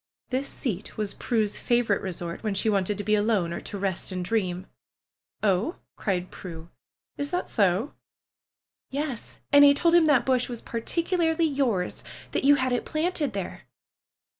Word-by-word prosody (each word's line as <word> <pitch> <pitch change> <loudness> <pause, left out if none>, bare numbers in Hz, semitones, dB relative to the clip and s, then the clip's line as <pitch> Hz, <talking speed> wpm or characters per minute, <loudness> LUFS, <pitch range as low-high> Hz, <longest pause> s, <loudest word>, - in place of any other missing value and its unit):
This 265 +2 0
seat 215 -6 -4
was 210 -2 -2
Prue's 215 -4 -1
favorite 235 -4 +2
resort 175 -2 -4
when 215 -3 -2
she 215 +3 +2
wanted 200 0 +1
to 205 - -3
be 210 +1 +1
alone 205 -5 +2
or - - -3
to 205 - -7
rest 195 -1 -1
and 180 -1 -3
dream. 185 -3 -1 0.8
"Oh!" 205 - +2 0.2
cried 185 -3 -2
Prue. 165 -2 -9 0.5
"Is 285 0 -1
that 360 +3 -2
so?" 200 +4 +1 1.0
"Yes! 275 -4 -4
And 285 0 +8
I 285 0 +8
told 335 +4 +2
him 340 -2 +6
that 290 -5 +4
bush 255 -1 +2
was 240 -2 -4
particularly 330 +8 0
yours. 260 - 0 0.3
That - - -1
you 285 +1 +7
had 260 -2 0
it 245 - 0
planted 310 - -1
there. 195 -2 -6
225 Hz, 165 wpm, -26 LUFS, 195-285 Hz, 1.0 s, And